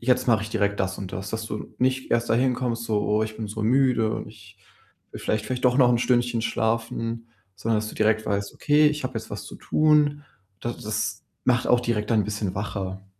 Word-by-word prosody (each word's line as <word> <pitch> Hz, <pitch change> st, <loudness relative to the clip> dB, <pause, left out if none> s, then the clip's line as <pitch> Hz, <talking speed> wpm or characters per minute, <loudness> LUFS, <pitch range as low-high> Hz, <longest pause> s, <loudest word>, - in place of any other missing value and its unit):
jetzt 125 Hz, +1 st, +2 dB
mache 115 Hz, -3 st, +3 dB
ich 110 Hz, -, -5 dB
direkt 100 Hz, -2 st, 0 dB
das 95 Hz, 0 st, -1 dB
und 95 Hz, -1 st, -7 dB
das.“ 95 Hz, +1 st, -5 dB
Dass 110 Hz, 0 st, -3 dB
du 105 Hz, -, -6 dB
nicht 130 Hz, +1 st, 0 dB
erst 120 Hz, -1 st, +1 dB
dahin 125 Hz, +2 st, +3 dB
kommst, 120 Hz, -2 st, -2 dB
so: 105 Hz, -2 st, 0 dB
„Oh, 105 Hz, +1 st, +2 dB
ich 110 Hz, 0 st, -4 dB
bin 110 Hz, -1 st, -4 dB
so 110 Hz, +1 st, -5 dB
müde 125 Hz, -2 st, +3 dB
und -, -, -5 dB
ich 105 Hz, -1 st, -16 dB, 0.5 s
will -, -, -8 dB
vielleicht 110 Hz, -1 st, -1 dB
vielleicht 130 Hz, 0 st, -3 dB
doch 125 Hz, 0 st, +3 dB
noch 125 Hz, -3 st, +6 dB
'n 120 Hz, -, +3 dB
Stündchen 120 Hz, -1 st, +1 dB
schlafen“, 115 Hz, 0 st, -2 dB, 0.3 s
sondern 110 Hz, +2 st, 0 dB
dass 110 Hz, -, -3 dB
du -, -, -11 dB
direkt 110 Hz, 0 st, +2 dB
weißt: 100 Hz, -1 st, -2 dB
„Okay, 150 Hz, +1 st, +4 dB
ich 150 Hz, -1 st, 0 dB
habe 130 Hz, -, -3 dB
jetzt 110 Hz, -, -10 dB
was -, -, -6 dB
zu -, -, -9 dB
tun.“ 150 Hz, -1 st, +2 dB, 0.4 s
Da 120 Hz, -, -2 dB
das 105 Hz, -2 st, -3 dB, 0.2 s
macht 125 Hz, -1 st, +2 dB
auch 125 Hz, -, +4 dB
direkt 115 Hz, -3 st, -1 dB
dann 110 Hz, -2 st, +4 dB
'n -, -, -5 dB
bisschen 105 Hz, -2 st, -3 dB
wacher. 95 Hz, -1 st, -4 dB
115 Hz, 225 wpm, -25 LUFS, 105-125 Hz, 0.5 s, noch